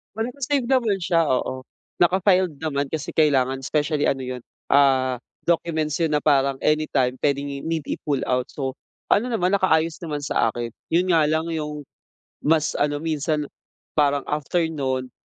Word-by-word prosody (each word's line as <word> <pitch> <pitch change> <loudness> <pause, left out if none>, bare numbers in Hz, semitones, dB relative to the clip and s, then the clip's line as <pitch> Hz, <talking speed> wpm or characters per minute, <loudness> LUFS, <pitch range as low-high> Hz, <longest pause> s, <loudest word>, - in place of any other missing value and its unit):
Well 225 +2 -1
naka-save 275 -1 -1
naman 235 -7 +2
siya, 170 -2 +2
oo 130 -1 -1 0.3
naka-filed 180 -2 +3
naman 145 -3 -1
kasi 160 -2 -4
kailangan 135 -4 +2
especially 150 +1 0
ano 135 - +1
'yun, 130 -1 -5 0.3
ah, 135 -2 +4 0.3
documents 160 -2 +1
'yun 160 -2 +1
na 150 - +2
parang 140 -2 +2
anytime 150 -5 +1
pwedeng 140 0 +1
i 140 0 -6
need 160 -2 -2
i-pull 145 -3 -2
out, 125 0 +1
so 135 -2 -4 0.4
ano 225 +5 +3
naman, 190 -6 0
nakaayos 165 -4 +2
naman 150 -3 -3
sa 125 -5 +1
akin. 120 -1 -4 0.2
'Yun 175 +3 +3
nga 155 - +4
lang 160 +2 0
'yung, 150 -2 -4 0.6
mas 155 0 +1
ano 145 0 +1
minsan, 155 -1 -1 0.5
parang 145 -2 +2
after 150 +4 -1
noon 130 -4 -2
150 Hz, 155 wpm, -23 LUFS, 140-165 Hz, 0.6 s, ah